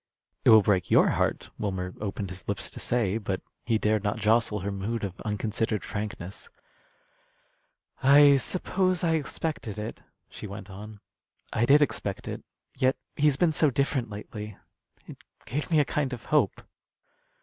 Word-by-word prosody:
"It - - +4
will 110 -2 +8
break 95 -3 +1
your - - +5
heart," - - -1
Wilmer 95 -3 -3
opened 100 -2 -4
his 95 0 -8
lips 100 -1 -1
to - - -8
say; 115 -3 0
but 100 -3 -2 0.3
he 115 -2 +3
dared 110 -1 +1
not 105 +1 -1
jostle 110 -1 +2
her 100 +2 -3
mood 105 +4 -3
of 95 -3 -5
unconsidered 110 0 -1
frankness. 100 -2 -6 1.5
"I 140 +1 +7
suppose 185 +5 0
I 165 - +2
expected 155 -7 -3
it," 105 +2 -6 0.3
she - - -9
went 100 0 -9
on. 105 +2 -10 0.5
"I 120 +2 +1
did 145 +2 +7
expect 100 -8 -3
it. - - -5 0.3
Yet 130 +1 +2 0.2
he's 145 -2 +3
been 170 +1 +3
so 155 -1 +3
different 135 -2 0
lately, 105 0 -8 0.5
it - - -11 0.3
gave 145 +6 -3
me 160 -3 +4
a 145 - +4
kind 135 0 -1
of 120 - -8
hope." 145 - +1
110 Hz, 160 wpm, -27 LUFS, 100-140 Hz, 1.5 s, will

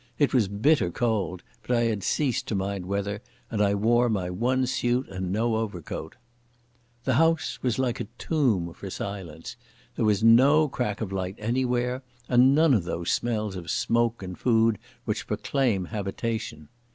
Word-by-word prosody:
It 145 - +2
was 120 -6 +3
bitter 105 - +2
cold, 100 -3 -1 0.2
but 120 +2 0
I - - +2
had 110 -3 0
ceased 135 +3 0
to 110 - -1
mind 95 -1 -3
weather, 100 +1 -2 0.3
and 110 -3 0
I 100 -1 +3
wore 120 +4 +3
my 95 -5 -1
one 125 +7 +1
suit 125 0 0
and 95 -1 -4
no 110 +2 +1
overcoat. 90 -7 -5 0.9
The 130 - +1
house 165 +4 +2
was 125 -3 0
like 125 -3 0
a - - -4
tomb 110 - 0
for 95 - -8
silence. 90 -4 -6 0.4
There - - -1
was 105 0 +2
no 135 +7 +6
crack 120 -6 -3
of 105 -4 -3
light 95 0 -3
anywhere, 125 +2 0 0.3
and 130 +2 +5
none 155 -1 +5
of 105 -7 +2
those 85 0 -2
smells 110 -4 -1
of 85 -3 -7
smoke 115 +1 +1
and 90 -1 -6
food 115 -2 +2 0.3
which - - -3
proclaim 120 -10 0
habitation. 105 -5 -4
110 Hz, 165 wpm, -26 LUFS, 95-125 Hz, 0.9 s, no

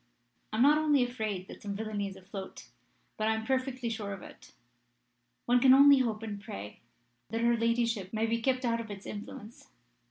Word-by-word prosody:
I 215 - -3
am 240 - +5
not 295 +2 +6
only 295 -4 +3
afraid 215 -6 -3
that - - -11
some 200 -1 -4
villainy 210 -1 -3
is 195 - -8
afloat, 190 0 -9 0.5
but 215 - 0
I 220 - +2
am 220 0 -4
perfectly 260 -1 -1
sure 215 -3 -3
of 195 - -9
it. - - -14 0.9
One 245 +1 +4
can 260 +1 +7
only 280 0 +8
hope 225 -4 -1
and 205 -2 -5
pray 105 - -8 0.5
that 225 +1 -2
her 235 0 +3
ladyship 230 -4 0
may 220 0 0
be 230 +1 -1
kept 255 +1 0
out 230 -1 +1
of 225 - -9
its 200 -1 -8
influence. 225 +2 -9
225 Hz, 195 wpm, -30 LUFS, 205-245 Hz, 0.9 s, only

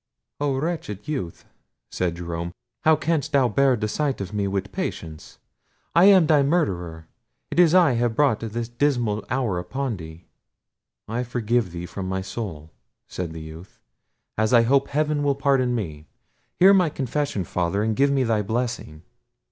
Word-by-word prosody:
"Oh 140 -2 0
wretched 135 - -4
youth!" 115 - -4 0.5
said 90 -2 -1
Jerome; 85 0 -5 0.3
"how 160 0 +6
canst 155 -1 -1
thou 135 -3 +4
bear 135 +3 +3
the 105 -2 -2
sight 140 +4 -1
of 95 0 -6
me 100 -1 0
with 100 0 -3
patience? 80 -2 -6 0.6
I 170 +2 +6
am 195 -4 +7
thy 150 -2 +4
murderer! 90 - -1 0.4
it - - 0
is 175 -1 +6
I 175 -6 +6
have 120 -1 0
brought 140 -6 +3
this 115 +1 -4
dismal 120 -4 0
hour 115 -8 0
upon 120 +6 -3
thee!" 80 0 -11 0.8
"I 115 +3 -2
forgive 120 -3 0
thee 85 0 -6
from 95 +1 -6
my 95 0 -2
soul," 95 -7 -6 0.4
said 90 -3 -5
the 80 0 -8
youth, 80 +4 -11 0.6
"as 110 +2 +2
I 120 -1 +7
hope 135 +3 +3
heaven 150 0 0
will 140 -1 +1
pardon 135 -3 +1
me. 80 -8 -5 0.5
Hear 190 +2 +7
my 180 -4 +4
confession, 140 -6 -2
Father; 90 +4 -1
and 110 0 0
give 140 +4 +3
me 140 -1 +2
thy 115 -3 +1
blessing." 110 -8 -3
115 Hz, 165 wpm, -24 LUFS, 95-140 Hz, 0.8 s, am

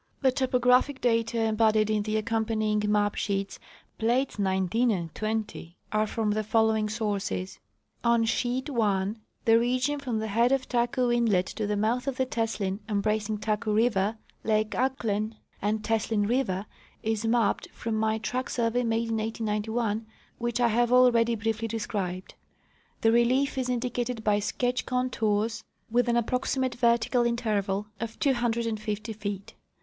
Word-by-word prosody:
The 260 - +5
topographic 255 +1 +2
data 230 -1 +1
embodied 215 -1 +3
in 215 -1 +1
the 215 +1 -1
accompanying 215 -1 0
ma}) 205 0 +2
sheets 200 -1 -2 0.4
(plates 240 +1 +1
19 190 +5 +1
and 170 -7 -2
20) 215 -5 -4
are 215 0 +1
from 215 -1 -1
the 215 +1 0
following 220 0 +2
sources: 205 -4 -3 0.4
On 235 -1 +3
sheet 250 +4 -1
i 205 -5 +1 0.3
the 225 0 +6
region 255 +4 0
from 250 -5 -2
the 220 0 -2
head 235 +4 +3
of 270 -1 +1
Taku 245 0 +1
inlet 225 -6 +2
to 215 -2 -2
the 210 0 0
mouth 235 +5 0
of 270 -2 -2
the 260 - +1
Teslin, 220 -5 -2
embracing 215 +1 0
Taku 215 +1 -1
river, 215 -1 +2 0.3
lake 215 0 +1
Ahklen, 225 -4 -1 0.3
and 215 +1 0
Teslin 220 -2 0
river, 210 -6 0 0.4
is 220 -1 -1
mapped 225 -2 +1
from 230 - -5
my 220 0 +1
track 250 +4 -3
survey 235 0 0
made 230 0 0
in 225 - 0
1891, 220 0 -2 0.3
which 240 0 -1
I 240 -1 +4
have 240 +2 +2
already 235 -2 +5
briefly 225 +1 -2
described. 205 -5 -4 0.7
The 225 - +4
relief 250 +5 +3
is 255 -1 -1
indicated 245 -1 -2
by 210 -1 +3
sketch 245 +4 -1
contours 225 -4 0 0.3
with 245 +1 +2
an 235 - +3
approximate 255 +2 0
vertical 235 0 +2
interval 210 -4 0
of 225 0 -5
250 230 -4 -1
feet. 205 -2 -5
225 Hz, 145 wpm, -27 LUFS, 210-240 Hz, 0.7 s, the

